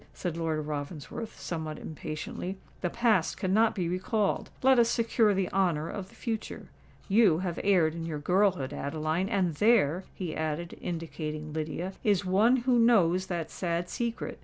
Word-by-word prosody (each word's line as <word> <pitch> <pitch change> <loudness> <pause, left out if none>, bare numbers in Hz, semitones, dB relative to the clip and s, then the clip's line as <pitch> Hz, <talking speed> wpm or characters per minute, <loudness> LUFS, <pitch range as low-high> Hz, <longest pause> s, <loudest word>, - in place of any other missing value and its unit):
said 175 -3 -3
Lord 160 -2 -1
Ravensworth, 150 +8 -6
somewhat 160 -3 -4
impatiently. 160 +4 -5 0.2
"The 175 - 0
past 220 -5 +2
cannot 210 +3 +2
be 180 -4 -1
recalled: 195 +4 0
let 265 -1 +6
us 230 -1 +4
secure 230 -2 +3
the 190 -1 +1
honour 170 -5 +1
of 195 -2 -6
the - - -19
future. 225 -3 -5 0.4
You 205 -5 +5
have 175 -2 -3
erred 180 -6 +3
in 165 0 -5
your 155 -2 -3
girlhood, 180 -2 +1
Adeline! 155 +6 -2
and 190 -6 +1
there," 190 -2 +3
he 175 -5 -4
added, 160 +2 -3
indicating 155 -3 -5
Lydia, 160 +4 -3
"is 200 -3 +2
one 210 +7 +4
who 250 -2 +4
knows 190 -6 +4
that 170 -3 -3
sad 175 -1 -2
secret. 235 -1 -3
180 Hz, 160 wpm, -29 LUFS, 160-205 Hz, 0.4 s, let